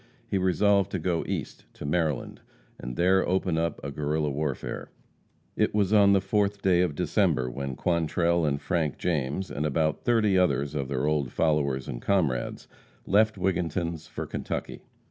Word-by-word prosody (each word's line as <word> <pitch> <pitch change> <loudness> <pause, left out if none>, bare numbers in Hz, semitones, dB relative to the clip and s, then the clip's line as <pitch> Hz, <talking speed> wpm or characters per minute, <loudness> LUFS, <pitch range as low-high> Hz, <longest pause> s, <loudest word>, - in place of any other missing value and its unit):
He 95 - 0
resolved 100 +1 +3
to - - +1
go 85 0 -1
East, - - -4
to - - -8
Maryland, 75 -2 -1 0.4
and - - -6
there 95 +4 +3
open 90 -3 +1
up 85 -1 -1
a 70 - -4
Guerrilla 75 +1 -1
warfare. 70 -2 -3 0.7
It - - +1
was 105 -1 +2
on 100 -2 +6
the 100 - +5
fourth 100 +1 0
day 90 -2 +4
of 85 -5 0
December 65 -2 +1
when 70 +1 -4
Quantrell 85 +1 +1
and 70 -2 0
Frank 80 -4 -1
James 80 +2 -2
and 75 - -3
about 80 +1 0
thirty 110 -5 +3
others 70 -5 +1
of 70 -3 -2
their 70 0 -1
old 75 -4 0
followers 70 -5 0
and - - -5
comrades 80 -11 0 0.4
left 110 +2 +3
Wigginton's 85 -3 -2
for - - -5
Kentucky. - - -5
80 Hz, 165 wpm, -27 LUFS, 70-95 Hz, 0.7 s, on